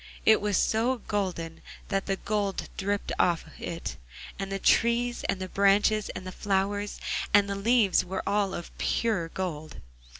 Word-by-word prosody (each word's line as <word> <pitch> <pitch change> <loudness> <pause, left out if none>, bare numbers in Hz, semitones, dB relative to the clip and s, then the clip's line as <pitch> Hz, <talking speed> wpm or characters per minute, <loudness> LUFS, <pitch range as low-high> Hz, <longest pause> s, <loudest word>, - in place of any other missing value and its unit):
It 220 -1 +6
was 205 -1 +1
so 235 +4 +2
golden 180 -6 -2 0.3
that 195 -1 -1
the 195 - +1
gold 200 -1 -2
dripped 200 +1 -2
off 170 -2 +2
it, 170 0 -5 0.4
and 195 0 -4
the 195 - -1
trees, 235 +4 +2
and 195 - 0
the 185 - -4
branches, 200 +2 +3
and 185 - -6
the 185 - -5
flowers, 205 +1 -1 0.4
and 205 -1 +6
the 200 - -2
leaves 205 0 +3
were 185 +1 -4
all 200 -1 +1
of 170 - -8
pure 210 -8 0
gold. 160 -4 -5
200 Hz, 160 wpm, -28 LUFS, 185-210 Hz, 0.4 s, It